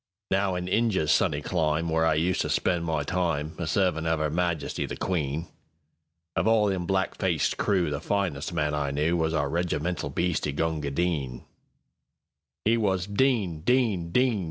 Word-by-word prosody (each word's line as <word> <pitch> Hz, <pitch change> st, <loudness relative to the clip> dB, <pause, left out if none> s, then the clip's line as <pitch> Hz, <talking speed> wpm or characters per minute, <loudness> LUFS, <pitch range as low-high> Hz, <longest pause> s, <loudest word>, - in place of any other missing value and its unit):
Now 95 Hz, -1 st, +1 dB
in 90 Hz, 0 st, -3 dB
Injia's 95 Hz, -6 st, +2 dB
sunny 75 Hz, -3 st, +2 dB
clime, 80 Hz, -1 st, 0 dB
Where 80 Hz, 0 st, +2 dB
I 80 Hz, -, +3 dB
used 85 Hz, +4 st, +1 dB
to -, -, -2 dB
spend 85 Hz, -2 st, +1 dB
my 80 Hz, -3 st, 0 dB
timeA 85 Hz, -1 st, -2 dB
servin' 80 Hz, -2 st, +1 dB
of 80 Hz, -1 st, +1 dB
'Er 75 Hz, -1 st, 0 dB
Majesty 85 Hz, -1 st, -1 dB
the -, -, -6 dB
Queen, 80 Hz, -3 st, -1 dB, 0.9 s
Of -, -, +1 dB
all 110 Hz, -1 st, +4 dB
them 90 Hz, -3 st, -2 dB
black 95 Hz, -1 st, 0 dB
faced 90 Hz, -5 st, +1 dB
crewThe 85 Hz, -8 st, 0 dB
finest 95 Hz, -7 st, -1 dB
man 75 Hz, 0 st, 0 dB
I 75 Hz, -1 st, 0 dB
knewWas 80 Hz, +3 st, +1 dB
our 70 Hz, -, 0 dB
regimental 85 Hz, +1 st, -1 dB
bhisti, 80 Hz, -5 st, -1 dB
Gunga 80 Hz, -2 st, -1 dB
Din.It 70 Hz, -, -5 dB
was 95 Hz, -5 st, +1 dB
"Din! 100 Hz, -, +1 dB
Din! 105 Hz, -7 st, +1 dB
Din! 125 Hz, 0 st, +2 dB
85 Hz, 155 wpm, -27 LUFS, 75-95 Hz, 0.9 s, all